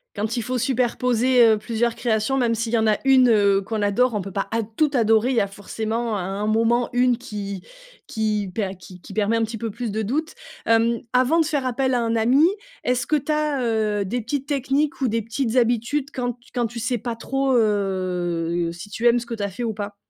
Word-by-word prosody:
Quand 215 +4 -2
il 235 - -1
faut 255 +3 -2
superposer, 250 0 +2
heu, 220 -1 +5
plusieurs 230 +2 -1
créations, 235 +3 0
même 235 -3 +2
s'il 230 0 -3
y 235 - +2
en 220 -1 +2
a 210 - +3
1 265 -2 +5
heu, 200 -3 +4
qu'on 215 +2 -3
adore, 230 +5 +2
on 210 - -1
peut 195 +1 -7
pas 195 - -2
ad 225 -1 0
tout 310 -2 +3
adorer. 225 0 +3
Il - - 0
y - - +4
a 200 - 0
forcément 220 +3 -3
à 195 - -2
un 195 +3 -3
moment 230 +2 +2
une 245 -1 +3
qui 200 -4 -6 0.5
qui 210 -2 -1
per 200 -4 -1
qui 180 -1 -13
qui - - -12
permet 215 +2 +1
un 230 - +1
petit 225 +1 -4
peu 225 0 -4
plus 230 +1 -4
de 220 +1 -2
doute. 305 +9 -2 0.3
Hem, 230 +1 +3
avant 255 +7 +3
de 320 - +1
faire 285 -4 -1
appel 260 +1 0
à 245 - +2
un 230 0 0
ami, 250 +8 +4 0.4
est-ce 245 -1 +1
que 305 +5 +2
tu 290 - -7
as, 300 -3 0
heu, 215 -3 0
des 240 +6 -2
petites 270 +4 -3
techniques 280 +1 0
ou 255 - +2
des 230 +1 0
petites 230 +2 -2
habitudes 245 +4 +1
quand 245 -1 -2
t 245 +1 -26
quand 245 -2 0
tu 235 +1 -7
sais 235 +2 -1
pas 230 +1 -5
trop, 270 +2 -1
heu, 180 -5 0
si 175 +5 -10
tu 225 +3 -4
aimes 240 0 +5
ce 235 - -8
que 235 - -6
tu 205 - -4
as 200 - -1
fait 230 +6 -5
ou 225 - -2
pas? 205 0 -6
230 Hz, 240 wpm, -23 LUFS, 210-250 Hz, 0.5 s, heu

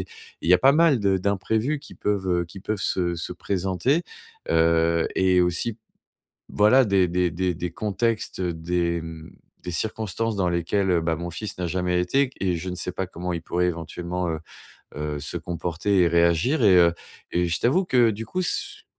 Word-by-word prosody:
et - - -5 0.4
il - - -2
y - - +9
a - - +5
pas 135 +9 +5
mal 155 -3 +4
de 100 -1 +2
d'imprévus 110 +9 0
qui 145 - -13
peuvent, 100 -2 -1
heu, - - -2
qui 95 +3 -11
peuvent 105 0 -3
se 85 -2 0
se 85 - -4
présenter. 95 - 0 0.5
Heu 85 0 +3
et 95 -1 +3
aussi, 90 +6 -1 0.7
voilà 110 +6 +5
des 95 -3 +3
des 90 0 +1
des 90 +1 -1
des 85 +1 -4
contextes, 110 +3 -2
des, 85 0 -1
mmh, 80 0 -9 0.3
des 90 - -6
circonstances 110 +3 -2
dans 95 -2 +1
lesquelles, 85 +3 0
heu, 85 -2 +3
bah, 80 0 0
mon 85 +1 -5
fils 100 +4 -6
n'a 90 -1 -2
jamais 90 0 0
été, 90 +10 +2
et 140 - +1
q - - -25
et 90 -2 +1
je 85 +3 -5
ne 90 - -4
sais 90 0 -4
pas 95 0 -3
comment 90 0 -5
il 85 - -3
pourrait 90 +1 -1
éventuellement, 85 +1 -3
heu 80 -1 -2 0.6
heu, 75 0 -3
se 75 +4 -4
comporter 85 +3 -1
et 85 - +5
réagir. 85 - +2
Et 95 -3 +6
heu, 85 -1 +5 0.4
et 90 0 +1
je 80 - -1
t'avoue 165 +11 +2
que 125 -8 +4
du 110 +2 -6
coup, 185 +8 -3
ce 175 - +1
ch - - -4
90 Hz, 205 wpm, -24 LUFS, 85-105 Hz, 0.7 s, y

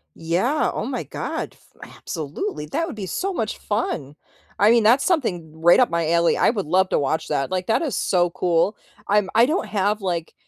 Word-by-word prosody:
Yeah, 185 - 0
oh - - -4
my - - -3
god, - - -5
f - - -16
absolutely. 150 -1 -5
That 330 - -1
would 330 - -7
be 200 -3 -6
so 385 - -2
much 225 -10 -3
fun. 155 - -3 0.4
I 205 +2 +5
mean, 230 -1 +4
that's 240 +6 +4
something 175 - -1
right 170 +2 +6
up 250 - +4
my 170 -1 -1
alley. 170 0 +3
I - - +3
would 200 -8 -4
love 185 +3 +2
to - - +1
watch 150 +3 -1
that. 135 - -1
Like, 185 -1 -2
that 225 - +2
is 305 -6 -2
so 175 -2 +2
cool. 175 +3 0 0.3
I'm 205 -1 +2
I 230 +2 +6
don't 320 +6 -1
have, 205 +1 0
like 170 -3 -3
190 Hz, 205 wpm, -22 LUFS, 170-225 Hz, 0.4 s, right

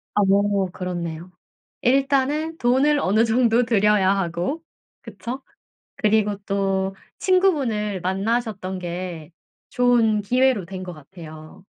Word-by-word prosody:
어. 200 0 +2
그렇네요. 175 -1 -5 0.5
일단은 275 +5 +1
돈을 270 +4 +3
어느 215 0 +2
정도 235 +1 +3
들여야 210 -3 +3
하고. 180 - -2 0.4
그쵸? 255 +3 -7 0.6
그리고 210 -1 +1
또 195 -1 -1 0.2
친구분을 270 - +1
만나셨던 195 0 -2
게 175 -2 -6 0.4
좋은 235 -4 +2
기회로 250 -2 +2
된 190 +1 -7
것 180 -1 -6
같아요. 155 +1 -13
205 Hz, 225 characters per minute, -22 LUFS, 185-245 Hz, 0.6 s, 돈을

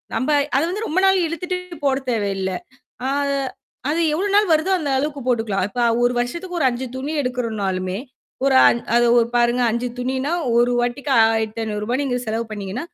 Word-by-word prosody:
நம்ப 260 - -1 0.3
அத - - +3
வந்து 420 +5 -3
ரொம்ப 330 +5 +1
நாள் 385 0 +5
இழுத்துட்டு 360 +3 -3 0.3
போட 270 -1 +3
தேவையில்ல. 195 -4 -1 0.6
அ - - 0 0.8
அது 325 +3 +1
எவ்ளோ 370 +6 0
நாள் 415 -4 +4
வருதோ 315 +5 +2
அந்த 290 -4 -2
அளவுக்கு 285 +1 -2
போட்டுக்கலாம். 225 -6 0
இப்ப 245 +3 -3 0.2
ஒரு 245 - +3
வருஷத்துக்கு 340 +9 -3
ஒரு 275 - +2
5 245 +1 -4
துணி 275 +3 -4
எடுக்கறனாலுமே. 205 -7 -2 0.5
ஒரு 270 -1 +3
அ - - +7 0.3
அது 240 0 +4
ஒரு 230 - +2
பாருங்க 240 +1 +2
5 235 +2 -1
துணினா, 260 +4 -1 0.3
ஒரு 240 +1 +4
வாட்டிக்கு 250 +4 -2
ரூ.1500 220 +1 0
நீங்க 250 -3 -1
செலவு 225 +1 -2
பண்ணீங்கன்னா 205 - -5
245 Hz, 165 wpm, -21 LUFS, 225-295 Hz, 0.8 s, அ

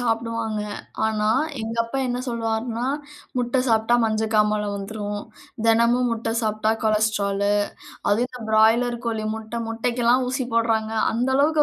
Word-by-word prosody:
சாப்பிடுவாங்க. 230 -2 -1 0.5
ஆனா 215 -1 0 0.3
எங்க 225 +1 -4
அப்பா 270 +4 -4
என்ன 245 0 -1
சொல்வார்ன்னா, 230 +1 -2 0.5
"முட்ட 245 +1 +1
சாப்பிட்டா 225 +1 +3
மஞ்ச 220 0 0
காமால 210 0 +3
வந்துரும்" 205 +1 -4 0.5
"தெனமும் 235 +2 +4
முட்ட 225 0 -2
சாப்பிட்டா 215 0 +1
கொலஸ்டரால்" 210 -2 +1 0.6
அதுவும் 235 +5 +2
"இந்த 250 0 -10
பிராய்லர் 230 +2 +4
கோழி 220 -2 -1
முட்ட 220 +1 -5
முட்டைக்கு 235 +2 -1
எல்லாம் 255 +2 +4
ஊசி 255 -1 -1
போடுறாங்க" 225 -1 +1 0.2
அந்த 245 +3 0
அளவுக்கு 300 +2 +4
225 Hz, 135 wpm, -23 LUFS, 215-240 Hz, 0.6 s, தெனமும்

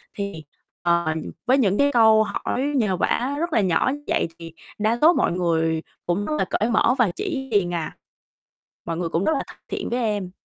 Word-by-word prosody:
Thì, 200 -6 -5 0.4
ờ, 170 -1 +2 0.4
với 260 +2 +4
những 205 -6 +2
cái 285 0 +3
câu 220 -3 +5
hỏi 210 +4 -3
nhờ 210 -8 +1
vả 260 +9 0
rất 340 -1 -2
là - - +4
nhỏ 190 +7 +2 0.2
vậy - - +1
thì 165 -1 -9 0.3
đa 215 +2 +1
số 330 +3 +7
mọi - - +1
người 165 -2 0 0.2
cũng 180 +4 -1
rất 305 - -2
là - - +1
cởi 220 +3 +1
mở 235 +2 +3
và 240 -7 +3
chỉ 280 -10 -4
liền 180 -5 +1
à, 165 -2 -3 0.9
mọi 165 - -3
người 170 0 -2
cũng 165 +3 -1
rất - - +2
là - - -1
thân - - -13
thiện - - -4
với 245 - 0
em. 205 -5 -1
205 Hz, 205 wpm, -23 LUFS, 175-250 Hz, 0.9 s, số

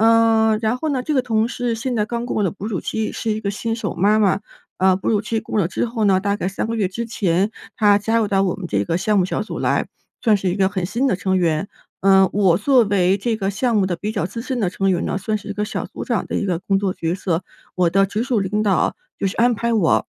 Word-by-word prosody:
呃， 225 -1 +4
然 225 +2 0
后 315 - -3
呢， 260 -3 -1
这 305 - -1
个 265 - +3
同 225 -2 +1
事 245 -2 -2
现 250 +3 -3
在 210 -2 +1
刚 235 +1 -3
过 230 - -1
了 195 - +2
哺 200 +3 -8
乳 200 -6 -2
期， 220 -1 -3
是 225 - -2
一 215 0 -2
个 200 -2 -2
新 225 +2 -3
手 230 - -3
妈 205 +5 +3
妈。 195 -2 +3 0.4
呃， 190 0 +4
哺 190 - -5
乳 210 -3 +2
期 225 +1 -2
过 215 - -4
了 180 - +2
之 185 - -1
后 230 -1 -2
呢， 190 -1 +4
大 200 0 0
概 185 - -2
3 195 +3 -3
个 230 - -2
月 205 -4 +1
之 230 +5 -4
前 195 -2 0 0.2
她 205 -3 +4
加 225 +3 0
入 225 -2 +2
到 195 -1 +2
我 185 - 0
们 195 - -7
这 100 -6 0
个 165 - 0
项 210 +3 +1
目 180 - +2
小 - - -2
组 215 - -5
来， - - 0 0.3
算 220 -2 +4
是 190 -1 -1
一 180 - -1
个 195 -1 +2
很 185 -3 -2
新 235 +8 -1
的 250 - +2
成 190 0 0
员。 170 +1 0 0.3
呃， 190 -1 +5
我 190 -4 +3
作 255 +2 +4
为 195 -1 +2
这 225 +3 -1
个 195 -3 -2
项 230 +4 0
目 200 -3 +3
的 185 -2 -1
比 210 +5 -3
较 205 -6 -1
资 230 +6 -5
深 255 +1 -3
的 195 -6 +1
成 195 +1 0
员 175 - 0
呢， - - -1
算 215 +3 -1
是 210 - -12
一 - - -3
个 210 +1 -2
小 215 - -4
组 - - -7
长 - - -1
的 - - -3
一 - - -1
个 180 -4 -1
工 195 +1 0
作 195 -2 -1
角 165 -1 -2
色。 185 -2 -2 0.3
我 180 -2 +3
的 195 +3 +3
直 210 +3 -2
属 250 -3 0
领 200 +2 -1
导 200 -3 +1 0.2
就 - - +1
是 185 - -4
安 240 +1 +4
排 235 +1 -1
我 200 -8 +2
205 Hz, 305 characters per minute, -20 LUFS, 190-225 Hz, 0.4 s, 呃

